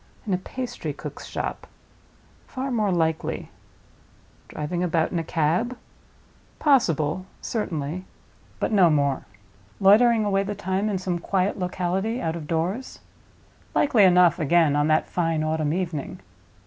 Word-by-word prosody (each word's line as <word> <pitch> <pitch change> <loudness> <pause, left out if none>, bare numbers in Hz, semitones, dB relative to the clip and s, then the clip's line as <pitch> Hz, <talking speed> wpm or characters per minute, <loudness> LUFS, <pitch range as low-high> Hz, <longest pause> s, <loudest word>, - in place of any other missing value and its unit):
In 200 - -1
a - - +2
pastry 250 +6 -5
cook's - - -8
shop? - - -4 0.8
Far 265 0 -4
more 215 -5 +1
likely. 160 -2 -1 1.0
Driving 165 +4 -4
about 165 -2 +1
in 175 - -1
a - - -2
cab? 170 +11 0 0.8
Possible, 185 - +2
certainly; 175 -5 -3 0.5
but - - -1
no 190 -5 +5
more. 140 -3 +1 0.5
Loitering 220 +3 +5
away 195 -1 +2
the 200 +1 -3
time 195 +1 -1
in 200 - 0
some 180 -2 -2
quiet 190 +3 0
locality, 185 +5 -1
out 165 -5 -2
of 160 -3 -7
doors? 175 +11 -2 0.8
Likely 240 -7 +4
enough, 180 -2 +5
again, 160 -1 +3
on 145 +1 +2
that 155 0 +2
fine 165 -3 0
autumn 155 -1 0
evening. 165 -4 -3
180 Hz, 135 wpm, -24 LUFS, 160-205 Hz, 1.0 s, no